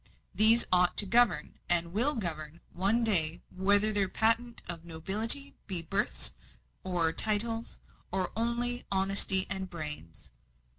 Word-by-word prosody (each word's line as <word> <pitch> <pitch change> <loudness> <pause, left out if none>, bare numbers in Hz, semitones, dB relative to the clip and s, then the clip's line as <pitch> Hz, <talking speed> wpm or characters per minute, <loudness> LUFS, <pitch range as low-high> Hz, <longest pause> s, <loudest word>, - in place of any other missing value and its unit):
These 225 +2 +9
ought 180 0 0
to 205 - +6
govern, 235 +3 -1
and 170 -1 0
will 255 +9 -2
govern, 165 -6 -7
one 200 +6 -3
day, 170 -6 +1
whether 200 +3 0
their 200 -2 -2
patent 230 +3 -2
of 170 -1 -8
nobility 200 - +2
be 180 -4 -1
births - - -4 0.5
and 170 -3 -3
titles, 225 +2 -1 0.3
or 185 -1 -4
only 235 +2 -3
honesty 195 0 +1
and 190 -1 -7
brains." 150 - -9
195 Hz, 130 wpm, -26 LUFS, 170-225 Hz, 0.5 s, These